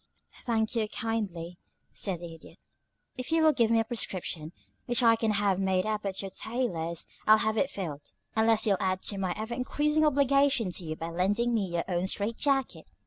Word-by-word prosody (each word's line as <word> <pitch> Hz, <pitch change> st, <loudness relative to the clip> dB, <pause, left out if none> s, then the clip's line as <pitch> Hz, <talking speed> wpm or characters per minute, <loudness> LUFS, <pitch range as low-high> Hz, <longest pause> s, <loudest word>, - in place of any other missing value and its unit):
"Thank 225 Hz, -1 st, 0 dB
you, 220 Hz, -2 st, +1 dB
kindly," 195 Hz, -8 st, -3 dB, 0.3 s
said 185 Hz, -4 st, -1 dB
the 170 Hz, -1 st, -7 dB
Idiot. 165 Hz, -, -15 dB, 0.6 s
"If 255 Hz, -, -5 dB
you'll 320 Hz, -1 st, +4 dB
give 230 Hz, -5 st, +2 dB
me 230 Hz, 0 st, +4 dB
a -, -, +2 dB
prescription, 185 Hz, -8 st, -3 dB, 0.4 s
which 240 Hz, 0 st, +2 dB
I 230 Hz, -1 st, +6 dB
can 225 Hz, 0 st, -1 dB
have 200 Hz, -2 st, +1 dB
made 190 Hz, -1 st, +1 dB
up 215 Hz, -1 st, -2 dB
at 195 Hz, 0 st, -2 dB
your 195 Hz, -, -6 dB
tailor's, 180 Hz, -8 st, -2 dB, 0.2 s
I'll 215 Hz, 0 st, +8 dB
have 220 Hz, 0 st, 0 dB
it 270 Hz, +5 st, +1 dB
filled, 155 Hz, -7 st, -6 dB, 0.2 s
unless 220 Hz, 0 st, +3 dB
you'll 200 Hz, -3 st, +3 dB
add 185 Hz, 0 st, -1 dB
to 200 Hz, -, -1 dB
my 185 Hz, -2 st, -1 dB
ever 220 Hz, +2 st, -4 dB
increasing 300 Hz, +5 st, +1 dB
obligation 275 Hz, -6 st, +3 dB
to 175 Hz, -, -4 dB
you 155 Hz, -1 st, -4 dB
by 165 Hz, +1 st, -5 dB
lending 205 Hz, +8 st, +1 dB
me 210 Hz, -4 st, +1 dB
your 170 Hz, -1 st, -2 dB
own 180 Hz, 0 st, -1 dB
strait 210 Hz, +4 st, -1 dB
jacket. 275 Hz, -2 st, 0 dB
215 Hz, 195 wpm, -29 LUFS, 185-235 Hz, 0.6 s, I'll